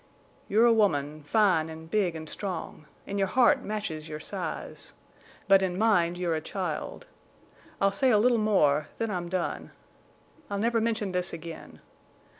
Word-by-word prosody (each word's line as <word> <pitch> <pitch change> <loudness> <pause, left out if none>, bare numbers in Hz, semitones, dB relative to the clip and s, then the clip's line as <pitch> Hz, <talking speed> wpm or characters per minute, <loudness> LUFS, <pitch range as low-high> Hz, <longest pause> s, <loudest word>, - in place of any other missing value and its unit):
"You 215 +3 +3
are - - +7
a 235 - +6
woman, 155 -9 +1
fine 165 -1 +2
en' 160 0 -9
big 180 0 0
an' 160 0 -6
strong, 170 -3 -5 0.2
an' 200 0 -3
your 195 - +2
heart 255 +6 +4
matches 180 -9 -5
your 150 - -6
size. 170 0 -5 0.5
But 195 -1 +6
in 185 -1 -1
mind 180 -5 +2
you're 175 -2 -1
a 155 - -1
child. 175 -2 -4 0.7
I'll 195 0 +3
say 260 +6 +2
a 220 - +5
little 235 +2 +3
more—then 190 0 +1
I'm 175 -3 -3
done. 180 -1 -3 0.8
I'll 200 - -2
never 230 +2 +1
mention 220 -3 -1
this 180 0 -1
again. 165 0 -9
190 Hz, 160 wpm, -28 LUFS, 160-215 Hz, 0.8 s, are